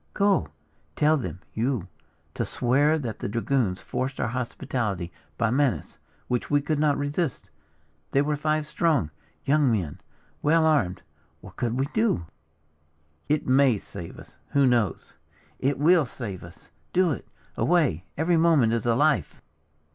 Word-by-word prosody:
"Go! 200 - +3 0.5
Tell 155 +1 +4
them, 115 -10 -4
you, 115 -4 -1 0.5
to - - -2
swear 145 +6 +2
that 120 -8 -5
the - - -3
dragoons 115 -3 0
forced 130 +1 -4
our - - 0
hospitality 115 -7 -3 0.3
by 115 -2 +1
menace, 135 0 0 0.3
which 125 -1 -1
we 145 - +4
could 145 +1 -1
not 150 -1 +3
resist. 145 - -2 0.6
They 140 - +2
were 150 0 0
five 155 +1 0
strong 150 - +1 0.3
young 145 -2 +3
men, 90 -10 -2 0.4
well 160 +2 +4
armed. 110 - +1 0.4
What - - -13
could 120 0 -1
we 135 - +2
do?" 215 - +1 1.0
"It 150 0 +1
may 130 -3 +4
save 85 -3 -9
us - - -14 0.2
who 140 -1 +4
knows?" 120 -8 +1 0.5
"It 135 +1 +1
will 160 0 +4
save 105 -8 -7
us! 85 0 -15 0.2
Do 180 -2 +3
it. 130 - -5 0.3
Away! 155 - +2
Every 165 +3 +2
moment 160 -9 +4
is 115 0 -1
a 115 - +3
life!" 150 +3 +1
135 Hz, 145 wpm, -26 LUFS, 115-155 Hz, 1.0 s, Tell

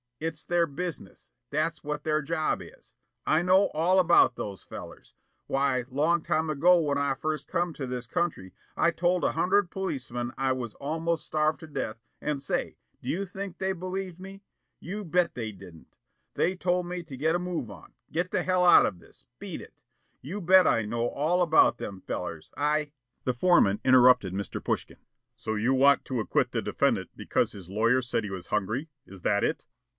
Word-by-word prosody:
It's 160 -1 -4
their 175 -1 +2
business. 170 +3 -7 0.2
That's 155 +3 -1
what 150 0 -4
their 155 -1 +1
job 155 +2 -1
is. - - -14 0.3
I 155 - +3
know 185 +2 +4
all 175 +5 +3
about 170 -7 +5
those 100 -5 -6
fellers. - - -10 0.3
Why, 135 -2 +1
long 155 +6 +2
time 160 -1 0
ago 170 +4 +5
when 145 -3 0
I 140 -1 +1
first 155 +1 -3
come 175 -2 -1
to 140 - -5
this 125 -1 -4
country, 165 - -2 0.3
I 170 - +3
told 175 +1 +1
a - - +2
hundred 190 0 +2
policeman 130 -10 -3
I 135 0 +1
was 120 -4 -5
almost 160 +3 -2
starved 155 -1 0
to 160 - -9
death 135 -7 -4 0.2
and 150 -2 -2
say, 140 - -2 0.2
do - - -6
you 195 +4 -1
think 195 0 -7
they 190 0 -1
believed 185 0 -5
me? 195 +2 -10 0.4
You 205 +4 -6
bet 175 +1 +1
they 115 -3 -4
didn't. 90 -5 -15 0.4
They 185 - +1
told 180 0 0
me 180 0 -4
to 140 -5 -9
get 160 +5 +1
a - - +1
move 175 -9 -3
on, - - -14 0.2
get 175 +3 -1
the - - 0
hell 185 -1 +2
out 175 - +8
of 90 -4 -5
this, - - -18
beat - - -6
it, - - -16 0.4
you 180 +10 -5
bet 185 +1 +6
I 115 - +3
know 115 +3 -1
all 165 +6 +1
about 160 -3 +5
them 95 -2 -7
fellers. 80 -3 -5
I 150 +1 +1 0.2
" 125 - -51
The 125 - +1
foreman 120 - +4
interrupted 125 -7 +5
Mr. 100 -1 -4
Pushkin. - - -2 0.4
"So 110 - -4
you 115 +5 +1
want 140 +2 +4
to 130 -3 -2
acquit 110 - 0
the - - -1
defendant - - 0
because - - 0
his 95 -3 -11
lawyer 115 +6 +2
said 120 - -1
he 105 - -5
was 95 -2 -6
hungry, 110 +9 -1 0.2
is 95 -1 -13
that 100 +2 +1
it?" - - -1
155 Hz, 190 wpm, -28 LUFS, 125-175 Hz, 0.4 s, out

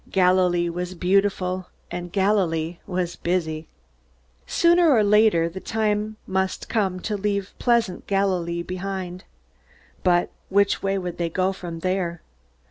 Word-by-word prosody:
Galilee 180 -2 +3
was 180 +2 -4
beautiful, 185 0 +1 0.2
and 175 0 -5
Galilee 175 -5 +1
was 180 -2 -2
busy. 165 -3 -2 0.8
Sooner 345 0 +4
or 225 -6 +5
later 210 -5 +4
the 175 +3 -6
time 215 0 -1
must 190 0 -1
come 195 -5 0
to 215 - -2
leave 200 -1 -2
pleasant 235 -6 +1
Galilee 180 -4 0
behind. 185 0 -5 0.8
But 175 -1 +3 0.2
which 200 +1 +2
way 195 0 0
would 180 -2 -5
they 170 -1 0
go 185 +3 0
from 170 -3 -7
there? 180 -2 -1
185 Hz, 125 wpm, -24 LUFS, 175-200 Hz, 0.8 s, or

